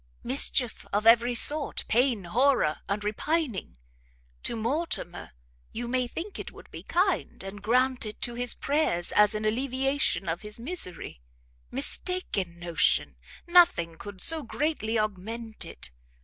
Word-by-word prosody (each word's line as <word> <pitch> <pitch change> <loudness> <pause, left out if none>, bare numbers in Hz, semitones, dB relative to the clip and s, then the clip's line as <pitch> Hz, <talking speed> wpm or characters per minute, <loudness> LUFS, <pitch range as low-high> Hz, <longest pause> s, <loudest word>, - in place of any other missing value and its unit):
Mischief 250 -2 +2
of 205 +2 0
every 235 +2 +5
sort, 295 +4 +2
pain, 240 -2 +2
horror, 230 - +2
and 205 +1 -1
repining! 220 - -2 0.6
To - - -2
Mortimer 230 - -3 0.4
you 240 +1 -4
may 250 0 0
think 355 +11 -6
it - - -6
would - - -15
be - - -8
kind, 365 - 0
and 195 +1 -8
grant 250 +2 +1
it 210 - -8
to 240 - -2
his 245 0 +1
prayers, 280 - 0
as 210 +1 +4
an 215 0 -2
alleviation 260 -3 0
of 165 +1 -2
his 210 +1 -3
misery; 230 - -4 0.5
mistaken 195 - 0
notion! 165 - +1 0.3
nothing 345 - +4
could 205 -2 -6
so 325 -1 +2
greatly 250 -4 -1
augment 215 +2 -4
it. - - -10
230 Hz, 135 wpm, -27 LUFS, 205-275 Hz, 0.6 s, every